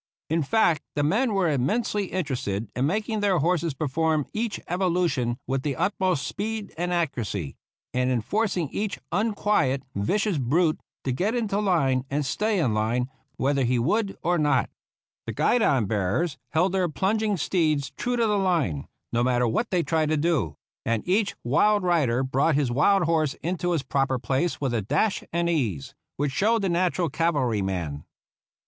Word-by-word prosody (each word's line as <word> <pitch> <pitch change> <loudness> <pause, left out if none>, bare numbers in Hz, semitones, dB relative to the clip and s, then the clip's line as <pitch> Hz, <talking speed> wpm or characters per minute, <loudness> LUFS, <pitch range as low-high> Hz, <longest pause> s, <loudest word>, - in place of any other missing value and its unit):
In 165 +1 +2
fact, 170 0 +2
the 145 - +1
men 210 - +1
were 190 -3 +2
immensely 195 - 0
interested 130 - -3
in 130 +3 +1
mak 210 +6 -1
ing 220 -2 -1
their 200 -3 +2
horses 165 -1 +1
perform 155 0 0
each 220 0 -2
evolution 170 -9 0
with 135 0 -1
the 140 -1 -2
utmost 185 -3 0
speed 215 0 -4
and 175 +2 -2
accuracy, 120 - -2 0.4
and 125 0 +1
in 125 -3 +1
forcing 190 - 0
each 210 +5 -3
unquiet, 205 - +1
vicious 190 - 0
brute 155 +6 +2 0.2
to 130 - -1
get 195 - 0
into 215 -4 0
line 145 -11 +2
and 145 +1 -1
stay 210 +10 0
in 135 - +1
line, 120 +4 0 0.2
whether 140 0 +1
he 125 +1 +2
would 195 - 0
or 175 0 +2
not. 150 -1 +2 0.6
The - - -3
guidon 140 - +2
bearers 105 - -1
held 170 +5 +2
their 185 -2 +1
plunging 205 +5 0
steeds 155 -6 0
true 245 - -2
to 235 -1 +2
the 210 -2 +2
line, 155 - 0 0.3
no 120 +1 +2
matter 125 -1 +2
what 220 - 0
they 180 -2 +1
tried 160 -2 +1
to 155 - +2
do; 145 - 0 0.3
and 115 +3 -1
each 200 +3 +1
wild 205 - +3
rider 145 -9 +2
brought 135 +4 +2
his 140 -4 +1
wild 185 +9 +3
horse 160 -3 +1
into 175 +1 -1
his 160 -5 0
proper 135 -2 0
place 135 +7 -1
with 135 -4 -1
a 115 - +1
dash 150 - 0
and 170 +1 0
ease 115 - -1 0.2
which 145 -1 0
showed 215 +9 +2
the 190 - +1
natural 175 0 +1
cavalryman. 100 - -1
160 Hz, 170 wpm, -25 LUFS, 130-190 Hz, 0.6 s, wild